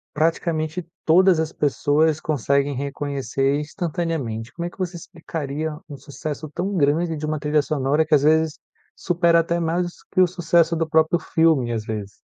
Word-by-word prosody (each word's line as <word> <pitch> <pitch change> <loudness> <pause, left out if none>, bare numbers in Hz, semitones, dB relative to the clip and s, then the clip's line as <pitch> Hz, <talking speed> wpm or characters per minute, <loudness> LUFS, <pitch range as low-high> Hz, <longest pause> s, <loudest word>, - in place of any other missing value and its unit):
praticamente, 160 +1 -1 0.2
todas 175 0 +5
as 160 0 -3
pessoas 150 +2 +1
conseguem 140 -1 0
reconhecer, 140 0 -1
instantaneamente. 155 - -3
Como 170 0 -4
é - - -3
que - - -20
você 185 -2 -3
explicaria 155 -2 -5
um 140 - -8
sucesso 145 +2 -6
tão 190 +4 -2
grande 160 +2 +1
de 155 - -4
uma 155 0 -1
trilha 150 +1 +1
sonora 145 +1 0
que, 155 -1 +4
às 140 - +2
vezes, 160 0 +3 0.4
supera 170 -1 +2
até 170 +1 -1
mais 170 +2 0 0.3
que 185 - +4
o 180 - +6
sucesso 170 -1 +2
do 165 -1 0
próprio 160 +2 +3
filme, 155 -10 +2
às 110 -2 -2
vezes? 105 -2 -5
155 Hz, 165 wpm, -22 LUFS, 145-170 Hz, 0.4 s, o